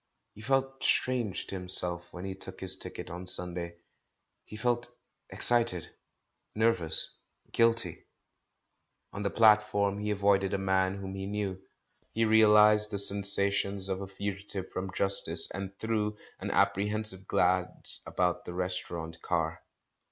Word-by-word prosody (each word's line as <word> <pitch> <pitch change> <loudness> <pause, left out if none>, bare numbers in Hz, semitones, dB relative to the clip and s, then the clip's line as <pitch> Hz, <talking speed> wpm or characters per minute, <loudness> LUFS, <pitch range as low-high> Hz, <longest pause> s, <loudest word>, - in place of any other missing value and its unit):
He 105 - -13
felt 135 +2 -1
strange 120 -9 +1
to - - -9
himself 90 -2 -1
when 90 +1 -8
he 95 - -4
took 95 0 -7
his 95 0 +1
ticket - - -7
on 90 +1 -7
Sunday. 90 -1 0 0.7
He - - -11
felt 120 +2 -1 0.4
excited, 115 -8 +3 0.6
nervous, 105 -7 0 0.3
guilty. 115 -6 +1 1.1
On 100 - -5
the 100 - 0
platform 105 -2 +3
he 105 0 -3
avoided 100 -1 +2
a - - 0
man 95 0 +1
whom 95 -1 -6
he 95 0 -5
knew. 100 -2 -3 0.5
He 115 0 +2
realised 105 -1 +5
the 100 - -3
sensations 100 0 +1
of 95 0 -2
a 100 - -5
fugitive 100 0 -5
from 95 +1 -4
justice, 95 +1 +3
and 100 0 -6
threw 105 -2 -1 0.2
an - - -4
apprehensive 100 0 0
glance 90 0 0
about 90 -1 -1
the 90 - -7
restaurant 85 -3 -4
car. 80 -2 -1
100 Hz, 135 wpm, -30 LUFS, 95-105 Hz, 1.1 s, realised